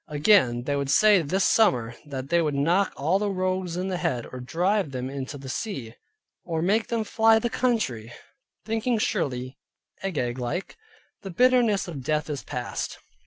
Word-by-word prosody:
Again, 145 - +3
they 145 +2 -1
would 140 -1 -2
say 205 +5 +5
this 185 +6 0
summer 125 - +3
that 135 -1 -6
they 170 0 +3
would 150 -3 -1
knock 170 +8 +2
all 160 +8 +1
the 210 0 0
rogues 185 -2 -2
in 185 +1 -2
the 185 - -1
head, 120 -8 -1
or 130 - -6
drive 180 +8 0
them 130 0 -4
into 140 +1 -5
the 135 -1 -10
sea, 130 - -4 0.5
or 165 -2 -2
make 215 +5 +2
them 230 -2 -1
fly 225 +1 +4
the 235 +1 -1
country; 130 - -1 0.5
thinking 225 +2 0
surely, 130 - -2 0.4
Agag 130 -10 -2
like, 125 +10 -4 0.5
"The 195 - -7
bitterness 235 -1 +3
of 155 -6 -6
Death 150 +3 -1
is 140 -4 -4
past." - - -5
170 Hz, 170 wpm, -25 LUFS, 135-205 Hz, 0.5 s, say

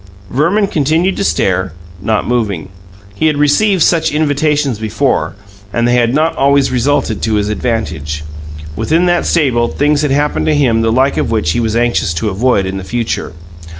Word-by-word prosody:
Verman 170 - +2
continued 165 +1 0
to - - -1
stare, 95 - 0 0.3
not 110 +1 -1
moving. 105 -8 -2 0.4
He 130 +11 0
had 150 -2 +1
received 165 +6 +3
such 165 -2 +2
invitations 150 -4 0
before, 110 +4 -1 0.4
and 120 +2 0
they 120 - +2
had 120 -1 +2
not 155 +4 +1
always 140 0 +2
resulted 125 -3 0
to 110 -1 0
his 105 0 0
advantage. 90 - -3 0.5
Within 165 - +1
that 175 -1 +1
stable 125 -8 +2
things 145 +2 +1
had 150 - 0
happened 145 +2 0
to 155 - +2
him 120 -6 +2
the 115 0 +1
like 130 +4 +1
of - - 0
which 110 -9 0
he 120 - -1
was 110 -1 -1
anxious 120 -7 0
to 105 +6 -1
avoid 100 0 +1
in 95 +1 -4
the 95 - -6
future. 115 -4 -3
125 Hz, 180 wpm, -14 LUFS, 110-150 Hz, 0.5 s, received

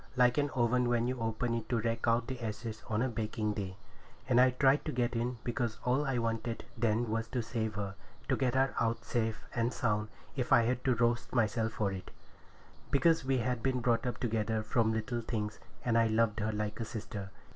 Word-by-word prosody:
like 125 -1 +5
an 145 0 +1
oven 125 0 +2
when 120 -1 +2
you 130 0 -2
open 115 +1 -1
it 115 -1 -3
to 120 - +2
rake 115 +1 -1
out 115 +1 +3
the 130 -1 -5
ashes 110 0 -4
on 110 +2 +1
a - - +2
baking 110 -2 -2
day. 95 -2 -5 0.5
And 125 0 +5
I 130 - +7
tried 135 +3 +3
to 155 - -1
get 120 -2 0
in, 120 +1 -1
because 120 -2 -1
all 130 +4 +2
I 135 -2 +1
wanted 115 0 -2
then 115 0 +1
was 115 +1 -1
to 120 0 -2
save 110 -2 -2
her—to 100 -2 -4
get 130 -1 0
her 135 0 +3
out 115 0 0
safe 115 -2 -1
and 120 0 +1
sound, 105 -2 0 0.3
if 125 -3 -2
I 115 - +7
had 125 +2 0
to 130 -2 +4
roast 120 +2 +1
myself 110 -1 +1
for 100 -3 0
it, 95 -1 -6 0.8
because 165 +2 +3
we 135 0 +1
had 125 0 -1
been 130 0 +1
brought 120 0 +1
up 125 - -2
together 110 -2 0
from 110 +1 +2
little 110 +2 -2
things, 105 -2 -3 0.3
and 120 -2 +2
I 115 0 +5
loved 110 0 +2
her 110 +1 0
like 105 +1 -3
a 115 - -2
sister. 105 -3 -6
115 Hz, 210 wpm, -32 LUFS, 110-125 Hz, 0.8 s, I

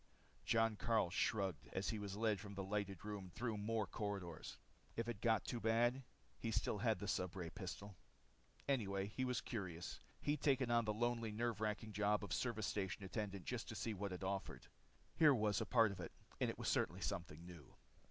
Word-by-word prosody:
Jon 115 -2 +3
Karyl 110 -7 +2
shrugged 95 -3 +1
as 95 - 0
he 110 - -1
was 100 -1 -4
led 110 -2 +2
from 100 +1 -7
the 100 - -2
lighted 100 -1 -2
room 100 -3 -4
through 115 +4 -2
more 105 +1 0
corridors. 100 -5 -4 0.4
If 115 0 -1
it 115 -4 -3
got 115 -3 +3
too 120 - -2
bad 120 +3 +3 0.4
he 115 - -1
still 105 -1 +1
had 110 0 +3
the 105 - -4
stubray 90 -3 -1
pistol. 100 0 -6 0.7
Anyway, 100 -8 +1
he 130 - +1
was 125 -2 +1
curious. 90 - -4 0.2
He'd 145 -1 0
taken 135 -4 +3
on 120 -1 +4
the 110 - +2
lonely, 115 -1 +1
nerve 115 -1 -1
wracking 110 0 -1
job 105 +1 +2
of 100 - -2
service 115 -4 0
station 100 -1 -1
attendant 100 -1 -3
just 120 -2 -3
to 110 - -4
see 110 0 -1
what 100 0 -3
it 90 +1 -4
offered. 95 0 -2 0.5
Here 155 -4 +8
was 105 -4 +2
a - - -1
part 115 -4 +6
of 95 - -7
it, 85 - -5 0.3
and - - +2
it - - -3
was - - -3
certainly - - +2
something 85 0 -3
new. 85 -6 -11
105 Hz, 195 wpm, -41 LUFS, 95-115 Hz, 0.7 s, Here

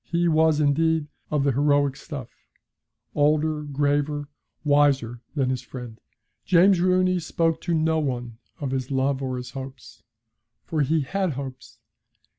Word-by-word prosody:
He 170 0 +1
was, 160 -1 +3
indeed, 160 +2 +2 0.2
of 150 -2 +1
the 140 - +3
heroic 145 +1 +2
stuff, - - -8 0.8
older, 150 +1 +2
graver, 145 0 -1 0.3
wiser 140 -5 +2
than 130 -3 +1
his 130 - -2
friend. 120 -3 -9 0.4
James 185 +1 +5
Rooney 185 0 +3
spoke 165 0 0
to 170 -2 0
no 160 0 +2
one 120 -5 -3 0.2
of 140 -3 -3
his 130 -1 -2
love 135 0 0
or 130 -1 -2
his 125 0 -7
hopes. 130 -3 -9 0.6
For 155 -2 -1
he 155 +3 +2
had 185 +4 -1
hopes. 130 -1 -8
145 Hz, 140 wpm, -24 LUFS, 135-160 Hz, 0.8 s, James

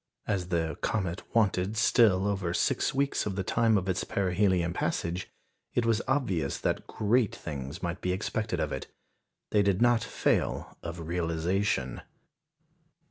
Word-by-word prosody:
As 95 -4 -1
the 80 -4 -1
comet 95 -5 -1
wanted 105 -2 +2
still 105 -4 +4
over 95 -4 -1
six - - +1
weeks 140 -4 0
of 95 - -2
the 95 - -1
time 115 +1 +3
of 95 -1 -2
its 95 -1 0
perihelion 90 -2 +1
passage, 85 +1 -2 0.5
it 120 - +2
was 115 -1 +2
obvious 90 - 0
that - - -2
great 110 +1 +1
things 70 +1 -6
might 85 +1 -3
be 90 - 0
expected 110 +3 -2
of - - -1
it. - - -4 0.6
They 105 - +4
did 100 -2 +2
not 120 -1 +4
fail - - 0
of 85 0 -6
realisation. 85 -4 0
95 Hz, 145 wpm, -29 LUFS, 85-110 Hz, 0.6 s, still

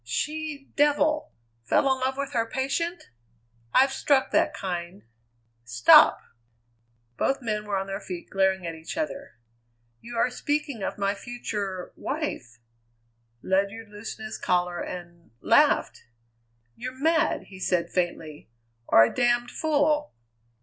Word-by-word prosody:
"She 300 - -4
devil! 295 +1 +2 0.3
Fell 115 - +3
in 260 - -5
love 260 +1 -1
with 280 0 -4
her 230 -1 0
patient? 335 - -2 0.6
I've 265 - +4
struck 270 0 +2
that - - +3
kind 180 0 -5 0.4
" - - -43 0.2
"Stop!" 115 0 +6 1.0
Both 270 - +1
men 210 -2 -2
were 205 -1 -1
on 190 - -2
their 195 0 -4
feet 180 -4 -7
and - - -34
glaring 190 -1 +1
at 165 - -3
each 160 - -8
other. 285 -3 -4 0.6
"You 235 0 -8
are 245 - +2
speaking 290 -3 -2
of - - -3
my 200 0 0
future 205 -5 -5
wife!" 270 - -4 0.9
Ledyard 200 +3 -1
loosened 215 +1 -8
his 215 - -6
collar 180 -1 0
and 175 -1 -8
laughed! - - +3 0.7
"You're 255 +2 -7
mad!" 320 +2 +2
he 190 -1 -11
said 180 -2 0
faintly, 160 -6 -3 0.4
"or 115 - +7
a 115 - +1
damned 240 0 +1
fool!" 300 -1 +1
220 Hz, 135 wpm, -26 LUFS, 185-280 Hz, 1.0 s, or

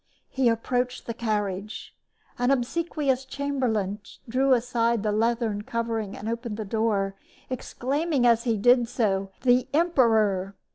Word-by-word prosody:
He 260 -2 +2
approached 245 +2 -1
the 230 - -3
carriage. 210 -3 -3 0.5
An 245 +1 +2
obsequious 275 0 0
chamberlain 255 -8 -2 0.3
drew 265 +3 +1
aside 235 -2 +1
the 210 - +1
leathern 225 -1 0
covering 225 -2 -3
and 210 - -7
opened 230 -1 -3
the 215 - -4
door, 205 -2 0 0.4
exclaiming 275 +3 -1
as 235 -1 +4
he 230 -3 +1
did 245 +3 +4
so, 195 -5 0
"The 250 -1 +4
emperor!" 220 - +2
235 Hz, 130 wpm, -26 LUFS, 215-255 Hz, 0.5 s, as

